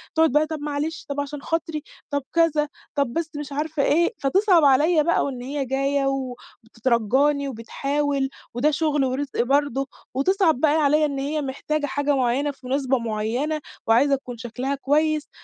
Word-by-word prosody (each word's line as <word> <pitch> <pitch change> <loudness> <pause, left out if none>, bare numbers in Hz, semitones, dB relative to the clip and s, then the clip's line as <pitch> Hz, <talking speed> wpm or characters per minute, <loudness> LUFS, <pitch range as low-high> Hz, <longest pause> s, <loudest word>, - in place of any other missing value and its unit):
تقعد 320 -3 +4
بقى 300 +2 +3
"طَب 315 -1 -4
معلش، 295 +2 -3
طَب 280 0 -3
عشان 285 0 -6
خاطري." 325 -1 -2 0.3
طَب 285 -1 -1
كذا 315 -3 +3 0.3
طَب 280 -5 0
بس 330 -1 -2
مش 295 -1 -6
عارفة 300 +1 -1
إيه، 340 - +3
فتصعب 360 +2 +4
عليَّ 300 +4 +4
بقى 340 +3 +2
وإن 255 -3 -4
هي 275 +2 -3
جايّة 275 +2 0
وبتترجّاني 260 +1 0
وبتحاول، 275 +3 -1 0.2
وده 265 +6 +2
شغل 295 -2 +1
ورزق 260 0 -1
برضه، 275 0 +1 0.3
وتصعب 325 +1 +2
بقى 300 +1 +3
عليَّ 300 +2 +4
إن 280 -2 -2
هي 295 +3 -1
محتاجة 290 +2 -2
حاجة 285 0 0
معيّنة 265 +3 +1
في 270 -2 -13
مناسبة 265 0 +1
معيّنة 235 +8 -2 0.3
وعايزة 275 +5 +4
تكون 250 -3 -8
شكلها 250 +4 -3
كويس، 305 +2 +1
285 Hz, 160 wpm, -23 LUFS, 265-305 Hz, 0.3 s, تقعد